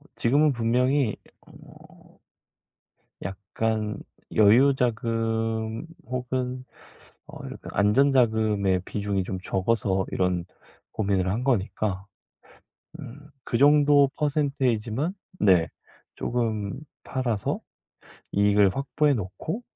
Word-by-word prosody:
지금은 145 +5 +3
분명히 125 +1 +1 0.3
어 - - -17 1.2
약간 105 +3 -3 0.4
여유 115 +7 +6
자금 115 0 -1 0.2
혹은 125 +1 -3 0.6
어 - - -12
약간 - - -9
안전 105 +8 +3
자금의 110 -6 +2
비중이 100 -2 -2
좀 95 0 -4
적어서 95 0 0
이런 90 -2 0 0.5
고민을 100 -3 0
한 115 +6 -2
거니까. 100 -5 -1 0.9
음. 145 +2 -11
그 115 - -1
정도 145 -1 +5
퍼센티지만 140 - 0 0.3
네. 90 -5 +4 0.5
쪼금 110 -4 -2 0.2
팔아서 120 -6 -2 0.7
이익을 100 -1 +4
확보해 145 +2 +1
놓고 125 - -5
115 Hz, 190 characters per minute, -25 LUFS, 100-130 Hz, 1.2 s, 여유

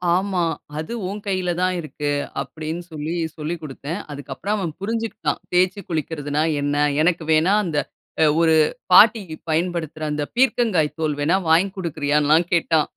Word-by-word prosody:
ஆமா. 185 -1 0 0.3
அது 160 +9 -4 0.2
உன் 205 +2 -5
கையில 185 -3 -1
தான் 185 0 +1
இருக்கு 145 -2 -3 0.3
அப்பிடின்னு 160 +2 -5
சொல்லி, 155 +1 -4 0.2
சொல்லி 155 +3 -3
குடுத்தேன். 150 +2 -6
அதுக்கு 140 -1 -8
அப்புறம் 205 +10 -2
அவன் 175 -6 -3
புரிஞ்சுக்கிட்டான். 225 -8 -2
தேய்ச்சு 185 +3 +2
குளிக்கிறதுனா 150 -2 -1 0.2
என்ன? 145 0 0 0.3
எனக்குவேணா, 165 +2 +3
அந்த 155 -4 0 0.4
அ - - +7 0.2
ஒரு 160 -1 +4 0.4
பாட்டியிப் 210 -7 +5
பயன்படுத்துற 165 -1 -1
அந்த 150 0 -1
பீர்க்கங்காய் 235 - +2
தோல் 155 -2 0
வேணா 155 +5 +2
வாங்கிக் 185 +4 +3
கொடுக்கிறாயான்லாம் 150 -1 +2
கேட்டான். 160 -2 +2
165 Hz, 140 wpm, -22 LUFS, 150-185 Hz, 0.4 s, அ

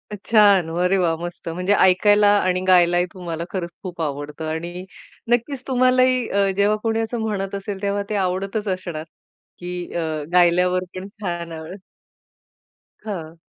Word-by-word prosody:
छान! 200 -5 +4
अरे 180 +2 +2
वाह! 170 -3 +1
मस्त. 175 -1 -7
म्हणजे 180 +4 0
ऐकायला 205 +2 +5
आणि 185 -1 0
गायलाही 175 -1 +5
तुम्हाला 170 -3 -5
खरंच 175 -3 -3
खूप 175 -3 -6
आवडतं 145 +1 -4
आणि 175 +3 -5 0.4
नक्कीच 245 +2 0
तुम्हालाही 255 -1 +3
अ, 200 0 +2
जेव्हा 205 +1 +3
कोणी 225 0 0
असं 225 +1 -2
म्हणत 200 -3 -2
असेल 195 0 -5
तेव्हा 200 0 -1
ते 210 - -1
आवडतच 195 +3 -1
असणार 180 -4 -3 0.6
की 180 0 -6
अ, 170 - -1 0.3
गायल्यावर 180 +1 +4
पण 185 +1 -6
छान 175 -4 -4
आवड. 160 +4 -8 1.3
हं. 165 -5 -6
185 Hz, 140 wpm, -22 LUFS, 175-205 Hz, 1.3 s, ऐकायला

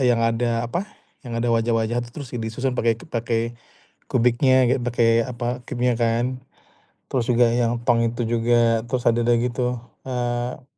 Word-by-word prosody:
yang 120 -3 +3
ada 115 0 0
apa 175 - -3 0.4
yang 120 -2 -5
ada 120 - 0
wajah-wajah 115 +1 +1
tuh 120 - -14
terus 135 - -7
disusun 120 +3 -2
pakai 115 -1 +2
pakai 115 -3 -2 0.5
kubiknya 130 +2 +3
gitu 130 - +1
pakai 115 -1 +3
apa 120 0 -3
cube-nya 125 0 +1
kan, 120 +2 0 0.7
terus 125 -3 0
juga 120 0 +4
yang 120 0 0
tong 120 -2 +3
itu 115 +1 -2
juga, 115 -1 +2
terus 125 -1 -2
ada 120 0 +2
deh 120 0 +4
gitu, 125 0 -1 0.3
eee 120 0 -3
120 Hz, 155 wpm, -23 LUFS, 115-125 Hz, 0.7 s, juga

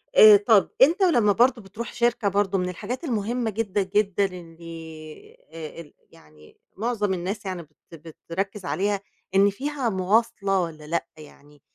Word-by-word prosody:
آآ، 435 -4 +10
طَب 410 - +3
أنت 395 -5 +5
ولمّا 240 - +4
برضه 240 +2 +3
بتروح 210 +4 -8
شركة 235 -2 +1
برضه 200 0 +1
من 180 -1 -1
الحاجات 215 - -6
المهمّة 235 -3 -1
جدًا، 205 -2 -1
جدًا 200 0 +1
اللي، 165 -3 -10 0.2
آآ، 165 0 -8
ال 150 - -16 0.2
يعني 75 0 -20 0.2
معظم 210 -2 -1
الناس 185 +4 -4
يعني 185 -3 -4
بت 150 -1 -27 0.5
بتركّز 195 +3 -3
عليها 195 +7 0 0.4
إن 200 +1 +6
فيها 270 +3 -3
مواصلة 200 0 +1
والّا 155 -3 -6
لأ 170 +1 -1
يعني، 145 -1 -16
195 Hz, 150 wpm, -24 LUFS, 170-230 Hz, 0.5 s, آآ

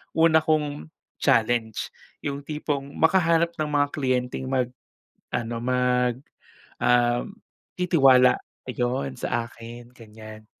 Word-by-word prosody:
una 160 -1 +5
kong 150 - -1 0.3
challenge 110 -1 +1 0.3
yung 140 -1 -3
tipong 145 -2 -4
makahanap 170 -1 +3
ng 155 -1 -2
mga 145 -1 +2
kliyenteng 130 -2 -1
mag 130 -2 +1 0.7
ano 120 -1 -3
mag, 125 -1 +1 0.6
um, 120 +7 +2 0.4
titiwala, 135 -8 +5 0.3
ayon, 130 +2 -2
sa 120 -1 -2
akin, 120 +1 -12
ganyan. 110 -2 -13
125 Hz, 100 wpm, -25 LUFS, 120-150 Hz, 0.7 s, una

